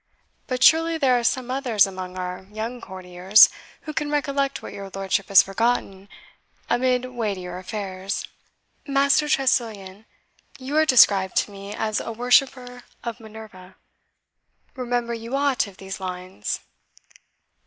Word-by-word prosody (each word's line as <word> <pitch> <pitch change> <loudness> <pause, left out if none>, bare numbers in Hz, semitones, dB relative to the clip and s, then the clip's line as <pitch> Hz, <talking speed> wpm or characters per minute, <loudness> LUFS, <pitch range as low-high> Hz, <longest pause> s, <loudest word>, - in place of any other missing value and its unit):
But 255 -1 -1
surely 325 +2 +5
there 265 -5 +3
are - - -5
some 255 +1 0
others 250 -6 +3
among 185 -1 -7
our 180 +1 -6
young 225 +3 -5
courtiers 185 +2 +4 0.3
who 305 - -7
can 295 -1 -2
recollect 280 -1 -1
what - - -8
your 195 -1 -8
lordship 195 0 -2
has 200 - +7
forgotten 195 -2 -2 0.6
amid 250 0 +1
weightier 200 -8 -4
affairs. 190 0 -5 0.6
Master 280 +2 +2
Tressilian, 220 -7 -1 0.5
you 270 +3 -6
are 315 0 +4
described 200 -7 +5
to - - +1
me 200 +1 -8
as 215 -1 -1
a - - -5
worshipper 245 +1 +1 0.2
of 235 0 -5
Minerva 215 -4 -12 1.0
remember 245 -2 -2
you 230 +3 -5
aught 275 -5 +1
of 195 -2 -14
these 195 0 -7
lines?" 180 - -5
225 Hz, 130 wpm, -23 LUFS, 195-255 Hz, 1.0 s, has